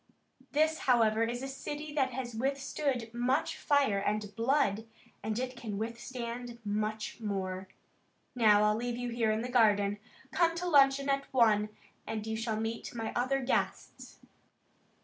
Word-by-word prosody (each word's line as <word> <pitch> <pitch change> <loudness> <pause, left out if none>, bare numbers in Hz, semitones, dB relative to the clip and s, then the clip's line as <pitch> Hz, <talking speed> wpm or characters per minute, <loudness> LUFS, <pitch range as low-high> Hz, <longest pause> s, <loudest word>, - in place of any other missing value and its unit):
"This, 315 +2 +2
however, 225 -3 +4
is 240 +2 -3
a - - -3
city 295 +3 -6
that 270 -3 +2
has 250 -2 -4
withstood 265 -1 -2
much 260 +7 0
fire 275 -9 +2
and 205 0 -2
blood 230 -3 +1 0.3
and 215 +1 -2
it 255 +1 -3
can 220 -4 -5
withstand 235 +1 -5
much 215 +2 -2
more. 190 -3 -3 0.7
Now 215 -4 +5
I'll 210 0 +3
leave 240 +1 -2
you 245 0 -3
here 230 -2 0
in 215 +1 +1
the - - -3
garden. 205 -4 +3 0.3
Come 335 -1 +2
to 360 +1 -3
luncheon 275 -3 +5
at 275 0 0
one, 215 -5 +4 0.4
and 220 -1 -3
you 220 0 -2
shall 220 -1 -2
meet 225 +2 -4
my 225 -1 -3
other 255 +3 +1
guests." 260 - -2
235 Hz, 150 wpm, -31 LUFS, 215-270 Hz, 0.7 s, Now